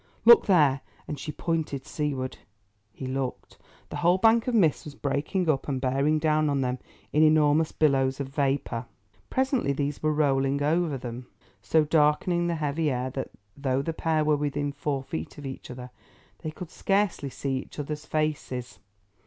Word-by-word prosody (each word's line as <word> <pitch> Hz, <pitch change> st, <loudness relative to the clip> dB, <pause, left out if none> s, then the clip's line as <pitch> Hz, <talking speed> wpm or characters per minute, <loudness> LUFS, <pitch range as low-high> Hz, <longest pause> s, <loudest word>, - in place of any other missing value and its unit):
Look 235 Hz, 0 st, +8 dB
there," 145 Hz, -8 st, +4 dB, 0.3 s
and 150 Hz, -, -5 dB
she 150 Hz, -, -5 dB
pointed 155 Hz, -5 st, -2 dB
seaward. 140 Hz, -4 st, -3 dB, 0.5 s
He 130 Hz, -, -8 dB
looked. 130 Hz, 0 st, -4 dB, 0.3 s
The -, -, -5 dB
whole 175 Hz, +2 st, +3 dB
bank 225 Hz, +4 st, +4 dB
of 250 Hz, -, +1 dB
mist 165 Hz, -9 st, +3 dB
was 150 Hz, -2 st, -9 dB
breaking 145 Hz, +7 st, -1 dB
up 145 Hz, -4 st, +1 dB
and 135 Hz, -3 st, -1 dB
bearing 135 Hz, +4 st, +1 dB
down 155 Hz, -1 st, +2 dB
on 140 Hz, -1 st, +1 dB
them 125 Hz, 0 st, -1 dB, 0.3 s
in 150 Hz, -, +4 dB
enormous 155 Hz, 0 st, +4 dB
billows 135 Hz, -3 st, +2 dB
of 140 Hz, -1 st, -3 dB
vapour. 135 Hz, -4 st, -1 dB, 0.4 s
Presently, 260 Hz, -, +1 dB
these 140 Hz, 0 st, -2 dB
were 155 Hz, -, +2 dB
rolling 140 Hz, -2 st, +1 dB
over 160 Hz, -1 st, +1 dB
them, 125 Hz, 0 st, -7 dB, 0.3 s
so 160 Hz, -1 st, +3 dB
darkening 160 Hz, +3 st, +2 dB
the 170 Hz, -, 0 dB
heavy 155 Hz, 0 st, 0 dB
air 130 Hz, -1 st, -2 dB
that, 135 Hz, +1 st, -4 dB, 0.3 s
though 135 Hz, -1 st, 0 dB
the 165 Hz, -, -2 dB
pair 160 Hz, -1 st, 0 dB
were 150 Hz, 0 st, +4 dB
within 145 Hz, 0 st, -1 dB
four 140 Hz, -1 st, -2 dB
feet 80 Hz, -11 st, -6 dB
of 145 Hz, -, -8 dB
each 135 Hz, -1 st, -7 dB
other, 125 Hz, 0 st, -8 dB, 0.5 s
they 155 Hz, -, -4 dB
could 160 Hz, +2 st, -9 dB
scarcely 195 Hz, -8 st, 0 dB
see 135 Hz, 0 st, -2 dB
one -, -, -9 dB
another's 150 Hz, +1 st, -5 dB
faces. 145 Hz, -8 st, -2 dB
145 Hz, 170 wpm, -27 LUFS, 135-155 Hz, 0.5 s, Look